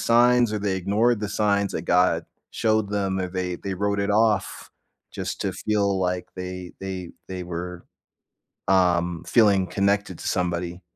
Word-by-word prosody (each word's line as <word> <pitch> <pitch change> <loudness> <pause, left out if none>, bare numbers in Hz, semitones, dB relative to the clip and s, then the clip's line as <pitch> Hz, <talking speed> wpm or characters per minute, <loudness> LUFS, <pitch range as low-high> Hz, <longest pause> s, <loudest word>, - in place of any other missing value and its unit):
signs, 120 -1 +4
or 105 - -1
they 100 -1 -1
ignored 105 +5 +2
the 105 - -2
signs 100 -1 +1
that - - -3
God 90 -2 +2 0.3
showed 110 -2 +1
them, 95 -2 -1
or 90 - -2
they 90 -1 -3
they 95 -1 -3
wrote 100 +1 0
it 100 0 0
off 110 0 +1 0.4
just - - -4
to 95 - -1
feel 100 0 0
like 90 0 -1
they 90 -1 -6
they 95 -2 -5 0.2
they 90 -1 -5
were, 90 0 -6 0.8
um, 90 -2 +2
feeling 100 -5 +4
connected 100 -1 0
to - - -5
somebody. 90 0 -1
95 Hz, 160 wpm, -24 LUFS, 90-105 Hz, 0.8 s, signs